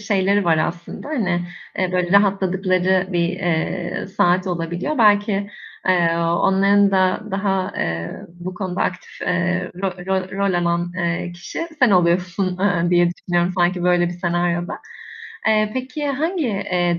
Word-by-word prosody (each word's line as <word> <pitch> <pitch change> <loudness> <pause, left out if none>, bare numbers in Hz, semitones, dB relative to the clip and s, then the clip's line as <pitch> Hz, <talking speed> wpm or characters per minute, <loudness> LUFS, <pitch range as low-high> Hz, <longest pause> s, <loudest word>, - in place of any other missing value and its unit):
şeyleri 200 -1 +1
var 165 -2 +3
aslında, 170 - -4
hani, 190 - 0 0.4
eee, 185 -1 0
böyle 180 -1 0
rahatladıkları 190 -2 +1
bir, 170 -1 +1
eee, 175 -1 -2
saat 180 +2 +3
olabiliyor. 175 - -2
Belki, 205 -2 +3 0.4
eee, 170 -2 +3
onların 195 +4 +3
da 185 -1 +2
daha, 195 -1 -1
eee, 85 +1 -3
bu 175 +2 -8
konuda 180 -1 -4
aktif, 185 0 -4
eee, 180 0 0
rol 180 -2 -3
rol 190 -1 -1
rol 200 -2 +1
alan, 175 0 0
eee, 175 0 -2
kişi 175 - -6
sen 255 -5 +5
oluyorsun, 180 +1 +1
eee, 175 -3 +1
diye 175 -1 +4
düşünüyorum 175 0 0
sanki 175 0 +2
böyle 175 0 +3
bir - - -5
senaryoda. 175 0 -1 0.7
Eee, 215 -1 +3
peki, 260 +3 -3
hangi, 315 +3 -1
eee, 180 -5 0
185 Hz, 140 wpm, -21 LUFS, 175-195 Hz, 0.7 s, sen